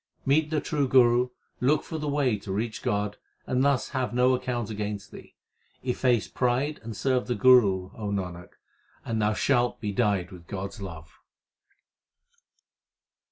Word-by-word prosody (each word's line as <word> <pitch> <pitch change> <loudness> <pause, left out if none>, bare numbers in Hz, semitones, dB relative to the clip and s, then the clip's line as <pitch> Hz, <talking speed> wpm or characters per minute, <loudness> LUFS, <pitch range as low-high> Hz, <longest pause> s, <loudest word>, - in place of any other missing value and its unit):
Meet 150 +3 +3
the 155 -1 +1
true 145 -2 -1
Guru, 125 -1 +4 0.3
look 140 +5 +2
for 160 - -5
the 150 - -3
way 140 -5 +1
To 100 - -7
reach 110 +3 -2
God, 105 0 -1 0.3
and 130 +1 +1
thus 140 -3 +2
have 130 -2 -2
no 125 +1 +4
account 120 -3 -2
against 105 -1 -4
thee. - - -13 0.5
Efface 125 -2 +1
pride 130 +4 0
and 115 -2 -7
serve 130 -2 0
the 125 - 0
Guru, 100 -6 +5
O 105 -2 -4
Nanak, 90 -3 -4 0.5
and 115 -1 -1
thou 105 +1 +2
shalt 120 0 +1
be 105 -2 -3
dyed 100 -4 0
with 85 -2 -12
God 100 0 -4
s 105 - -12
love. 85 -4 -9
120 Hz, 160 wpm, -27 LUFS, 100-130 Hz, 0.5 s, Guru